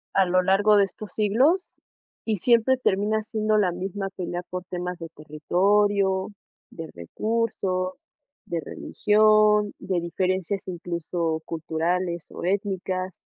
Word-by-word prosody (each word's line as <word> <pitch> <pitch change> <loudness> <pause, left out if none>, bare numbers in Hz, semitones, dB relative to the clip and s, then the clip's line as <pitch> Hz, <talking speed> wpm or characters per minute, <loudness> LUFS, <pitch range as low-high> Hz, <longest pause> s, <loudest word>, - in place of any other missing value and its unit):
A 195 - +5
lo 185 +1 +3
largo 205 +3 +4
de 200 - +6
estos 195 +1 -10
siglos 255 - +1 0.4
y 220 -2 -1
siempre 240 +5 +3
termina 215 -2 +1
siendo 215 0 0
la 195 -4 +3
misma 195 +2 -4
pelea 180 -2 -5
por 180 0 -6
temas 180 -1 -5
de 165 -1 -7
territorio, 190 +6 +1 0.4
de 165 -2 -8
recursos, 185 - -2 0.5
de 170 -5 -2
religión, 210 +3 +3
de 185 -2 -1
diferencias, 185 +2 -2
incluso 170 -2 -3
culturales 170 +2 -2
o - - -8
étnicas. 185 -1 -2
190 Hz, 120 wpm, -25 LUFS, 175-210 Hz, 0.5 s, de